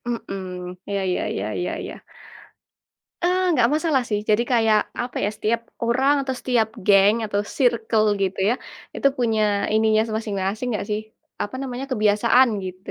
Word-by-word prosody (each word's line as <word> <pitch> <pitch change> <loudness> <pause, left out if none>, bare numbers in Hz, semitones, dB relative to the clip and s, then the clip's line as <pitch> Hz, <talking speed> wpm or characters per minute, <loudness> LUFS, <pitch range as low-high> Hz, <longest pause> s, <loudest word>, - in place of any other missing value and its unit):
Mhm, 230 -5 -4 0.5
iya 200 -1 -1
iya 180 - 0
iya 95 - -2
iya 180 - -2
iya - - -5
ya, - - -9 1.3
eee, 360 +1 +2
nggak 245 -6 +3
masalah 310 -4 +1
sih. 210 -2 0
Jadi 215 +2 +4
kayak, 225 -3 +4 0.2
apa 245 - -7
ya, - - +2
setiap 225 +2 0 0.2
orang 260 +5 +3
atau 265 -1 -3
setiap 235 -4 +1 0.2
geng 200 +2 +6
atau 205 -1 -1 0.2
sirkel 230 -4 +2 0.2
gitu 190 0 -1
ya, - - +2 0.4
itu 275 - +3
punya 225 -3 +1 0.3
ininya 220 0 +3 0.2
masing-masing 210 +1 -2
nggak 210 - -2
sih, 210 0 0 0.4
apa 205 - -5
namanya, 260 0 -4
kebiasaan, 225 +3 +4 0.2
gitu. 185 +1 -8
220 Hz, 160 wpm, -23 LUFS, 205-250 Hz, 1.3 s, geng